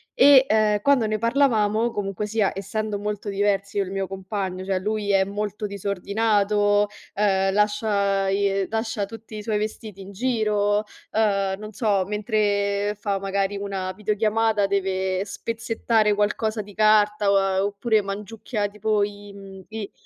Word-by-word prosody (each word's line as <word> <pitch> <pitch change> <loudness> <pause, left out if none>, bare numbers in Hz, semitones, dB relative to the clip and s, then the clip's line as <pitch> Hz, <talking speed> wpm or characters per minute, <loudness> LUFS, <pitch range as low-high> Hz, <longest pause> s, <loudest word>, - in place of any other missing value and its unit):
e, 270 -1 +7
uhm, 210 -1 +3
quando 275 -3 +3
ne 215 0 -1
parlavamo, 230 -2 +2
comunque 195 0 -3
sia, 210 -1 +1
essendo 205 +2 -3
molto 210 0 -4
diversi 200 0 0
io 200 - +3
e - - -7
il - - -7
mio 195 -1 -2
compagno, 190 -1 -4
cioè, 190 -1 0
lui 210 +1 -1
è 195 -1 +4
molto 205 +1 -4
disordinato, 205 +1 +1 0.3
uhm, 195 -2 +2
lascia, 205 -2 +1
i 195 0 +1
lascia 220 -2 -2
tutti 220 +1 -10
i 210 - -6
suoi 210 -1 -1
vestiti 215 -2 -6
in 195 - -10
giro, 210 -2 +1 0.3
uhm, 200 -3 +1
non 215 0 -8
so, 205 -4 +1
mentre 205 -1 0
fa, 200 -2 -1
magari, 195 +1 -1
una 195 -2 -3
videochiamata 215 +1 +1
deve 190 -1 -1
spezzettare 225 0 0
qualcosa 215 +1 0
di 205 0 -14
carta, 205 -2 +3
oppure 210 +2 +1
mangiucchia, 210 +2 -4
tipo 210 0 0
i, 205 0 -6
mhmm, 195 -1 -11
i 220 -2 -6
205 Hz, 145 wpm, -24 LUFS, 195-215 Hz, 0.3 s, e